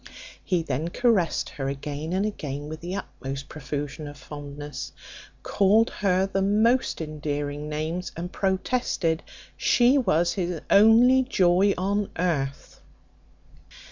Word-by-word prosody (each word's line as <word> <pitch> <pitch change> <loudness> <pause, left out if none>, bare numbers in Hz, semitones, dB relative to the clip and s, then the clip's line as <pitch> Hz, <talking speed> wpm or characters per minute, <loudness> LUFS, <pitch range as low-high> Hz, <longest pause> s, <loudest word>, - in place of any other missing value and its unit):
He 180 -3 0
then 145 +2 -2
caressed 205 -4 +1
her 135 -3 -4
again 145 +3 -5
and 190 +3 +1
again 145 -8 -4
with 155 0 -7
the 175 +3 -4
utmost 135 -7 -6
profusion 145 0 -5
of 145 0 -9
fondness, 145 +1 -8 0.5
called 210 +3 +3
her 190 -2 +1
by 195 - -9
the 195 - +1
most 215 +3 +2
endearing 150 -1 -4
names, 160 +4 -3
and 175 +2 -5
protested 190 -4 0 0.3
she 250 +3 +4
was 170 -8 +2
his 180 -3 -2
only 230 +5 +7
joy 195 -5 +3
on 200 +2 0
earth. 145 -6 -2
175 Hz, 125 wpm, -25 LUFS, 145-200 Hz, 0.5 s, only